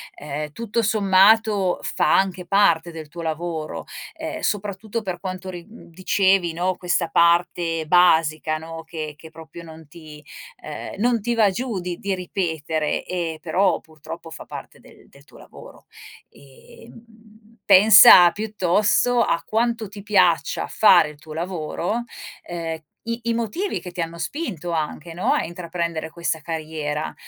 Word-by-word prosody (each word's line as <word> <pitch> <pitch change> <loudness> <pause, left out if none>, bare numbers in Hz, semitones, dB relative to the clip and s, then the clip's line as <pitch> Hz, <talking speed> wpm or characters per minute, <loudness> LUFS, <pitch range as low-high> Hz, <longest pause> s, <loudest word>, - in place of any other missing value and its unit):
ehm, 150 +1 -6
tutto 230 +4 -2
sommato, 205 -1 +3
fa 175 - +1
anche 190 -2 -1
parte 175 -3 +3
del 160 -2 -9
tuo 170 +3 -8
lavoro, 160 -1 -4 0.3
ehm, - - -6
soprattutto 205 +2 -3
per 185 -4 -5
quanto 185 0 -6
ri 175 -2 -8
dicevi, 185 -2 0
no, 180 +2 -1
questa 175 -1 -1
parte 170 -1 +2
basica, 160 -2 +3
no, 165 +1 -9
che 155 -3 -6
che 160 - -13
proprio 160 +1 -12
non 160 -2 -13
ti 150 -1 -13 0.4
ehm, - - -7
non 240 +1 +2
ti 240 +3 -1
va 215 -3 +4
giù 215 0 -3
di 175 -1 -5
di 195 -1 -2
ripetere, 160 -4 -2
ehm 170 -3 -4
però, 180 +4 +1
purtroppo, 160 +1 -11
fa - - -10
parte - - -10
del - - -19
del - - -20
tuo - - -18
lavoro. - - -15 0.4
E, 140 - -17
mhmm, 220 -1 -20
pensa 195 -3 +9
piuttosto 215 +4 +1
a 170 -6 0
quanto 230 -1 -1
ti 205 0 -10
piaccia 185 -5 +2
fare 175 -7 +5
il 150 -1 -14
tuo 155 0 -11
lavoro, 175 +6 -3 0.4
ehm, 165 -2 -5 0.2
i 230 +1 -3
i 230 0 0
motivi 235 - -3
che 180 - -8
ti 175 - -11
hanno 165 0 -3
spinto 175 - -4
anche, 160 0 -4
no, 175 - 0
a - - 0
intraprendere 170 -2 -4
questa 170 -1 -3
carriera 155 -2 -4
175 Hz, 150 wpm, -22 LUFS, 160-205 Hz, 0.4 s, pensa